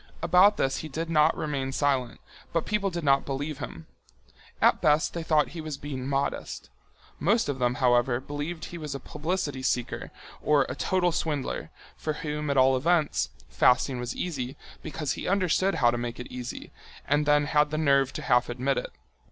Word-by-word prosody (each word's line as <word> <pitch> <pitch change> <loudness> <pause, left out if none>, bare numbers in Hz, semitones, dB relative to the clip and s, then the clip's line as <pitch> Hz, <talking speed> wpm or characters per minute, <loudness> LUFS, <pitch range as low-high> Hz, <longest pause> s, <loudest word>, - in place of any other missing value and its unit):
About 195 +3 +5
this 135 - 0
he 155 - -6
did 165 +3 -4
not 155 0 +4
remain 140 -3 -2
silent, 135 -3 0 0.3
but 165 - 0
people 210 -2 0
did 170 -2 -4
not 140 -1 +4
believe 140 +2 -4
him. 80 - -7 0.7
At - - +4
best 150 0 +3
they 170 - -3
thought 155 -2 +2
he 165 0 -7
was 155 -2 -5
being 135 -3 -5
modest. 140 0 -3 0.5
Most 225 +3 +2
of 140 -2 -2
them, 125 0 +1
however, 120 0 +3
believed 145 +4 -5
he 175 - -8
was 150 -3 -5
a - - -4
publicity 150 -1 -3
seeker 125 -2 -2 0.3
or 150 -2 +4
a - - -4
total 180 -2 +1
swindler, 155 -4 -2 0.3
for 155 - -2
whom, 150 0 -4
at 140 - +1
all 130 0 +5
events, 155 +3 +1 0.2
fasting 125 +1 +3
was 125 0 -4
easy, 140 -6 -4 0.2
because 150 -3 -3
he - - -4
understood 190 0 +2
how 120 -2 +4
to 120 - -2
make 120 0 -4
it 125 - -8
easy, 125 -1 -7 0.4
and 145 +1 +2
then 150 0 +4
had 150 0 +3
the 155 - -2
nerve 140 -3 +3
to - - -5
half 125 0 +3
admit 130 +3 0
it. - - -6
145 Hz, 185 wpm, -27 LUFS, 130-160 Hz, 0.7 s, About